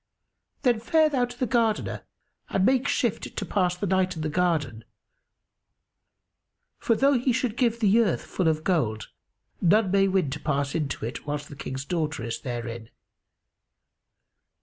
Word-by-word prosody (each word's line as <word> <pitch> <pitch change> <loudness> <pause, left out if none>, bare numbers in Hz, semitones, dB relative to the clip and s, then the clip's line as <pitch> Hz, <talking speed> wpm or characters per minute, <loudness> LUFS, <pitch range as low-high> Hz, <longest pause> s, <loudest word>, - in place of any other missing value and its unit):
Then 245 -4 +3
fare 310 +7 +3
thou 260 -4 +1
to 245 0 -11
the 255 - +1
Gardener 230 -3 0 0.4
and 190 - +1
make 260 +2 +3
shift 240 -6 -1
to - - -2
pass 180 -3 0
the 200 - -2
night 185 -1 +1
in 160 - -4
the 155 - -1
garden, 150 -9 0 2.0
for 230 - +2
though 275 +1 +3
he 255 +2 +1
should 245 -2 -1
give 235 -2 +1
the 215 0 +4
earth 215 -7 +1
full 185 - -1
of 155 -1 +1
gold 120 - 0 0.5
none 195 +2 +3
may 195 0 +4
win 185 -7 +1
to 150 - -4
pass 140 -2 -1
into 145 -8 -2
it, 120 +5 -6
whilst 145 0 -4
the 145 - -9
King's 135 -1 -5
daughter 155 -5 -2
is 115 0 -4
therein. 120 -2 -5
180 Hz, 160 wpm, -26 LUFS, 145-230 Hz, 2.0 s, the